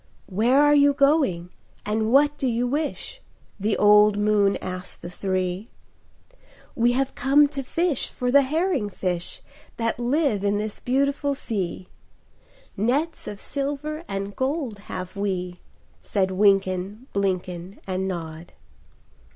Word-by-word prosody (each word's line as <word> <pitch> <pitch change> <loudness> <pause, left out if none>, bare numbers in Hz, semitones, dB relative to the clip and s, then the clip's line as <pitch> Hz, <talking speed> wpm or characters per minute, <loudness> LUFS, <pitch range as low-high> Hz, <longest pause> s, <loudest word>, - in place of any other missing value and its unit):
"Where 230 +8 +2
are 295 0 +5
you 285 -1 +5
going, 275 - +2 0.3
and 220 +1 0
what 290 +2 +5
do 265 - 0
you 240 0 0
wish?" 300 - -3 0.4
The 210 +2 0
old 210 0 +6
moon 205 -1 +3
asked 185 0 -6
the 175 - -6
three. 185 +2 -2 1.0
"We 240 +1 +2
have 270 +1 0
come 280 +3 +4
to 275 -1 -4
fish 325 +2 -1
for 250 0 -2
the 280 +2 +7
herring 300 - 0
fish 180 -3 -4 0.3
That 230 0 -1
live 245 -4 +1
in 205 0 +1
this 210 0 -4
beautiful 280 +2 0
sea; 190 -7 -4 0.9
Nets 275 - -1
of 205 - -6
silver 290 +4 -4
and 195 +1 -4
gold 260 -5 -2
have 185 +1 -6
we," 180 -3 -3 0.4
Said 190 -2 0
Wynken, 195 +2 +1
Blynken, 185 -1 -2
And 190 0 -2
Nod. 165 -2 -6
215 Hz, 130 wpm, -24 LUFS, 190-275 Hz, 1.0 s, the